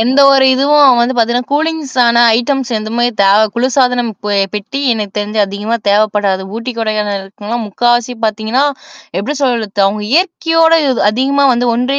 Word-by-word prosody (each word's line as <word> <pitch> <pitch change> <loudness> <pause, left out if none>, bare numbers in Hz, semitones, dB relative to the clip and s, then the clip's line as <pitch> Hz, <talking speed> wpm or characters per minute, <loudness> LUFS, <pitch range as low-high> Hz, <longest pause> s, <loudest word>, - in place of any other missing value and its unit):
எந்த 255 +5 +2
ஒரு 270 -1 +4
இதுவும் 280 -1 +4
வந்து 245 +2 0
பாத்தீங்கன்னா 240 +1 0
கூலிங்ஸான 280 -6 +1 0.2
ஐட்டம்ஸ் 260 0 -2
எந்தமாரி 235 +3 -1
தேவ 200 +2 +4
குளிர்சாதனம் 250 -1 0
பெ 210 - -2 0.2
பெட்டி 210 +7 -5
எனக்கு 210 -3 -5
தெரிஞ்சு 210 +1 -4
அதிகமா 205 +4 -3
தேவைப்படாது. 205 -2 +1
ஊட்டி, 235 +2 -5
கொடைக்கானல் 210 -2 -2
இருக்கனும்னா 205 +4 -6
முக்காவாசி 240 +3 0
பாத்தீங்கன்னா, 220 +5 -1 0.5
எப்பிடி 275 +9 -4
சொல்றது? 220 -6 -1
அவுங்க 210 +1 -2
இயற்கையோட 330 -1 +2
இ - - +1 0.2
அதிகமா 275 +5 0
வந்து 240 0 0
ஒன்றி 255 +4 -1
240 Hz, 145 wpm, -13 LUFS, 210-265 Hz, 0.5 s, ஒரு